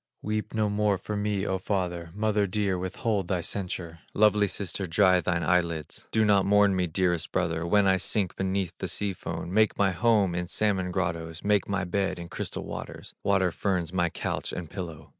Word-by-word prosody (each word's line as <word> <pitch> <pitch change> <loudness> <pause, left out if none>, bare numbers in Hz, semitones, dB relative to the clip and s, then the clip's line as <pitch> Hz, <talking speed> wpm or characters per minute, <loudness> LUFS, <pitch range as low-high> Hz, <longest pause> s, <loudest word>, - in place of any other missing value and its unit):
Weep 105 +1 -2
no 110 -1 +2
more 105 -1 +1
for 105 - -5
me, 105 -1 -1
O 95 -2 -1
Father, 90 -3 -2
Mother 105 -1 +1
dear, 100 0 0
withhold 95 +2 -1
thy 90 -2 0
censure, 85 -2 -4 0.2
Lovely 105 -1 +4
sister, 95 0 -3
dry 90 +2 +4
thine 90 -2 0
eyelids, 85 -3 0
Do 110 -1 +2
not 100 -2 +4
mourn 100 0 +4
me, 90 -1 +1
dearest 85 0 0
brother, 85 -2 -1
When 105 +2 +4
I 95 -1 +4
sink 95 0 0
beneath 95 -2 -1
the - - -2
sea 100 -1 -2
foam, 90 0 -5
Make 110 +1 +3
my 100 -2 +3
home 100 -1 +3
in 90 0 -2
salmon 95 -2 0
grottoes, 85 -3 -3
Make 100 -1 +2
my 100 -1 0
bed 95 +2 -1
in 85 -1 -8
crystal - - -5
waters, - - -7
Water 95 -2 +2
ferns 90 -2 -1
my 90 -2 +2
couch - - -3
and 85 -3 -6
pillow." 80 -5 -7
95 Hz, 190 wpm, -27 LUFS, 85-105 Hz, 0.2 s, Lovely